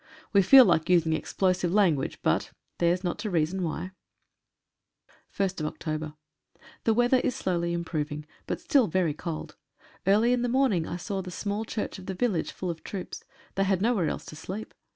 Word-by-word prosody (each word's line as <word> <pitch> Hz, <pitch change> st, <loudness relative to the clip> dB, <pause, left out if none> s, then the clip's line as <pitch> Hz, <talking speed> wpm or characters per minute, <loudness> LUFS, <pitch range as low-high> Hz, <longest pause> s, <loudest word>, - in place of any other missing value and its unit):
We 200 Hz, -, +6 dB
feel 260 Hz, +7 st, +9 dB
like 160 Hz, -5 st, +2 dB
using 165 Hz, -3 st, +4 dB
explosive 180 Hz, +1 st, 0 dB
lan 195 Hz, -4 st, +4 dB
gauge, 135 Hz, -, -4 dB
but -, -, +1 dB, 0.3 s
"Their's 175 Hz, +2 st, +2 dB
not 175 Hz, -, -2 dB
to 215 Hz, -, -3 dB
reason 175 Hz, +1 st, 0 dB
why." 180 Hz, +2 st, -3 dB, 1.4 s
1st 190 Hz, -4 st, -1 dB
Oct.— 155 Hz, -1 st, -4 dB, 0.7 s
The 225 Hz, -, +4 dB
weather 245 Hz, +2 st, +4 dB
is 250 Hz, -, -1 dB
slowly 170 Hz, -2 st, -1 dB
improving, 150 Hz, -3 st, -3 dB, 0.2 s
but -, -, -2 dB
still 270 Hz, -7 st, +3 dB
very 170 Hz, -2 st, +1 dB
cold. 155 Hz, +1 st, -6 dB, 0.5 s
Early 215 Hz, +5 st, +4 dB
in 250 Hz, -, +1 dB
the 245 Hz, -, 0 dB
morning 240 Hz, -10 st, +2 dB
I 175 Hz, -, -4 dB
saw 195 Hz, +1 st, -3 dB
the 185 Hz, -, -7 dB
small 205 Hz, +4 st, -3 dB
church 215 Hz, -2 st, -4 dB
of 185 Hz, -, -12 dB
the 190 Hz, -, -3 dB
village 200 Hz, -6 st, 0 dB
full 180 Hz, -2 st, -3 dB
of 160 Hz, -, -9 dB
troops, 190 Hz, -3 st, -6 dB, 0.3 s
they 195 Hz, -, +1 dB
had 195 Hz, -1 st, +1 dB
nowhere 210 Hz, -5 st, +2 dB
else -, -, -5 dB
to -, -, -9 dB
sleep. 190 Hz, +7 st, -7 dB
185 Hz, 180 wpm, -27 LUFS, 170-210 Hz, 1.4 s, feel